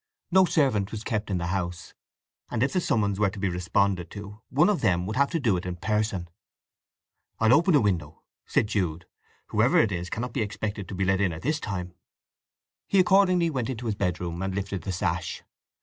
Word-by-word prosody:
No 190 +1 +6
servant 120 - +1
was 110 -1 -5
kept 110 -3 -2
in 95 - 0
the 85 - -2
house, 90 -2 -4 0.6
and 120 0 0
if 135 - 0
the 185 - +2
summons 100 - 0
were 105 -2 +3
to 105 - -10
be 100 0 0
responded 90 +1 0
to 105 +1 -9
one 150 +6 +4
of 210 -4 +1
them 90 -5 +2
would 110 +3 -4
have 140 +1 +3
to 165 - -1
do 110 -10 +2
it 90 - -4
in 90 - -3
person. 105 -2 -1 1.1
"I'll 110 +1 +5
open 170 +3 +5
a 145 - +5
window," 85 -7 -1 0.2
said - - +2
Jude. 90 -6 -2 0.4
"Whoever - - +3
it 110 - +4
is 90 -1 -3
cannot 120 +5 -4
be 130 - -1
expected 105 -2 -3
to 95 - -6
be 95 +1 0
let 95 +1 +2
in 95 -3 +2
at 80 +1 -8
this 150 +2 0
time." 90 - -4 0.9
He 195 - +3
accordingly 185 -2 +4
went 130 -4 -2
into 125 -2 -4
his 110 - 0
bedroom 90 -3 -2
and 95 0 -2
lifted 100 -1 -3
the 95 - -4
sash. 85 - -2
100 Hz, 210 wpm, -26 LUFS, 90-125 Hz, 1.1 s, No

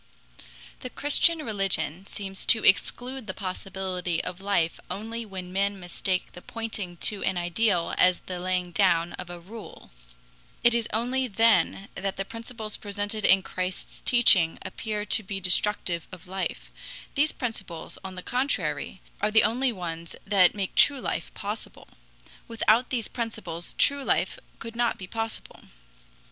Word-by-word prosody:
The 255 - -6
Christian 300 +4 +3
religion 195 -4 0
seems 195 -1 -5
to 220 - +6
exclude 245 +5 +2
the 190 - -4
possibility 185 -2 -3
of 180 +1 -5
life 195 -5 +1
only 225 +3 -4
when 185 -2 -7
men 200 +1 +1
mistake 180 +1 -2
the 180 - -11
pointing 215 -6 -5
to 205 - -6
an 190 - 0
ideal 175 0 +1
as 180 -1 +5
the 180 -1 -6
laying 180 0 -1
down 175 -3 +3
of 180 - -6
a 175 0 -7
rule. 210 +5 -11 0.7
It 235 0 +6
is 235 -1 0
only 250 +4 +1
then 225 -2 +3
that 195 +1 -3
the 195 - -2
principles 230 -1 -6
presented 205 +1 -4
in 190 0 +6
Christ's 185 0 -4
teaching 195 -9 +5
appear 210 -2 -3
to 215 - +2
be 195 -1 -4
destructive 180 -2 +1
of 180 -2 -11
life. 190 +1 -4 0.4
These 300 +2 +2
principles, 200 - -5
on 190 -1 -7
the 180 - -7
contrary, 190 - -1 0.2
are 210 - +3
the 220 +1 +6
only 250 +4 +2
ones 170 -4 -5
that 195 -3 +5
make 195 -2 -2
true 280 -2 +6
life - - -3
possible. 210 +2 -6 0.6
Without 230 +1 +3
these 235 -4 -1
principles 220 -8 -4
true 280 -1 +3
life - - +1 0.2
could 230 0 -8
not 240 -1 +1
be 190 - -6
possible. 225 +3 -5
200 Hz, 150 wpm, -27 LUFS, 180-230 Hz, 0.7 s, to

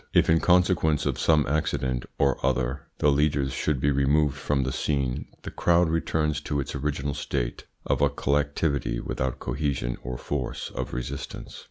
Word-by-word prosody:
If - - +5
in 80 - +5
consequence 90 -4 +3
of - - -1
some 75 -2 +4
accident 65 -5 -1
or 70 -1 +1
other 65 0 0
the 75 - +3
leaders 70 -2 +1
should 70 0 0
be 70 +2 +2
removed 70 +1 +2
from 70 0 0
the 65 - -1
scene 70 -3 -1 0.2
the - - -6
crowd 85 -1 +3
returns 75 -2 0
to 75 -1 -2
its 70 +1 -3
original 70 0 -2
state - - -3 0.2
of - - 0
a 70 - +5
collectivity 70 -2 0
without 65 -1 -2
cohesion 65 -2 -2
or 65 0 -5
force 70 -1 -4
of - - -4
resistance. 60 -1 -6
70 Hz, 165 wpm, -26 LUFS, 65-75 Hz, 0.2 s, If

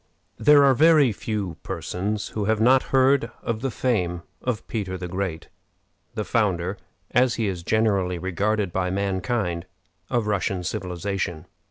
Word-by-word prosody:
There 145 -1 +6
are 135 -1 +6
very 150 -2 +5
few 100 -5 -4
persons 105 +3 -3
who 105 -2 -3
have 110 +1 +1
not 130 +4 +5
heard 135 -2 +3
of 115 -1 -2
the 135 - -1
fame 90 -9 -1 0.2
of 125 -4 -3
Peter 95 -5 -3
the 90 0 -5
Great, 90 -2 -4 0.7
the 105 - -2
founder, 95 -3 0 0.3
as 125 0 +3
he 115 - -1
is 95 -4 -2
generally 100 -2 +1
regarded 95 +2 -1
by 90 -1 0
mankind, 95 -2 -1 0.4
of 120 -3 0
Russian 100 -3 -1
civilization. 90 -1 -3
100 Hz, 145 wpm, -24 LUFS, 90-115 Hz, 0.7 s, There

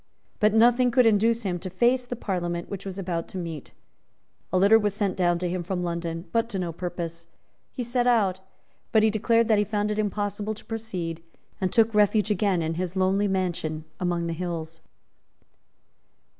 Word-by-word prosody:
But 210 0 +3
nothing 240 +2 +5
could 250 0 +4
induce 225 +2 +3
him 180 -3 -2
to 185 +2 -6
face 245 +7 +2
the 245 - -4
Parliament 175 -6 -3
which 200 0 -6
was 190 0 -6
about 175 -3 -3
to - - -8
meet. 165 -5 -6 0.8
A 185 - +2
litter 200 +4 +6
was 205 -2 -1
sent 205 -3 0
down 175 -2 +2
to 180 +1 -2
him 180 +1 -2
from 180 0 -3
London, 170 0 -3
but 230 0 +1
to 200 - -3
no 175 -2 -2
purpose. 170 -1 -5 0.4
He 250 - -4
set 240 +1 0
out, 200 -6 +3 0.5
but 220 - +5
declared 220 +1 +3
that 215 -2 +4
he - - +3
found 210 0 -1
it 210 - -2
impossible 205 +1 -2
to - - -14
proceed, 185 -8 -4 0.4
and 185 - 0
took 225 -1 +3
refuge 210 0 +3
again 195 -4 +1
in 160 +1 -1
his 185 0 -4
lonely 190 +2 +2
mansion 175 -5 -2
among 175 -2 -1
the 165 - -2
hills. 165 -1 -5
195 Hz, 185 wpm, -26 LUFS, 175-220 Hz, 0.8 s, litter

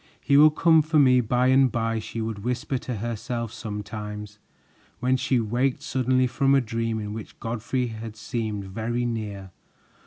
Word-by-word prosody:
"He 140 - +1
will 150 +2 +8
come 160 +1 +4
for 155 +1 0
me 130 -3 +6
by 125 +2 +2
and 130 -1 +5
by," 115 -1 -1
she 115 +1 -5
would 110 -2 -3
whisper 125 +2 -2
to 125 0 -5
herself 115 +1 -4
sometimes, 105 -1 -6 0.6
when 130 +1 +2
she 130 0 +1
waked 120 +4 0
suddenly 130 0 +1
from 135 +2 +2
a - - +5
dream 115 -1 -2
in 105 -1 -5
which 110 -1 -9
Godfrey 120 +2 -2
had 110 -1 -7
seemed 110 -3 -3
very 115 +5 -2
near. 105 -5 -4
115 Hz, 165 wpm, -25 LUFS, 110-130 Hz, 0.6 s, will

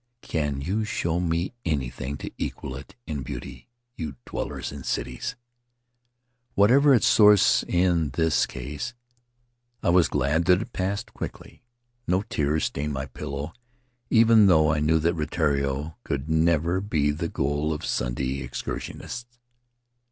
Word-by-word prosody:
Can 75 -4 -2
you 100 +9 -1
show 90 -5 -1
me 85 +3 -1
anything 70 -3 -2
to - - -7
equal 65 - -4
it 70 +1 -10
in 75 -3 -4
beauty, 60 - -7 0.3
you 75 -4 -5
dwellers - - -4
in 70 -1 -8
cities? 125 - -3 0.6
' 120 0 -48
Whatever 135 +8 +6
its 115 - +3
source 105 -2 +6
in 85 -3 +2
this 80 +1 +2
case, 75 - -6 0.9
I - - +2
was 90 -1 +5
glad 80 +4 +1
that 90 0 +5
it 110 - -7
passed 100 +3 -2
quickly. - - -8 0.5
No 90 +2 +2
tears 75 -8 0
stained 75 +1 -2
my 65 0 -3
pillow, 70 +4 -6 0.6
even 115 -2 +6
though 80 -4 +5
I 75 - 0
knew 75 +2 +3
that 85 +2 +1
Rutiaro 75 -2 -1
could 70 +1 -3
never 85 +2 +2
be 80 -8 +1
the 80 +3 -3
goal 75 +3 -1
of 75 - -3
Sunday 65 +2 -1
excursionists. 120 - -6
80 Hz, 140 wpm, -25 LUFS, 70-100 Hz, 0.9 s, Whatever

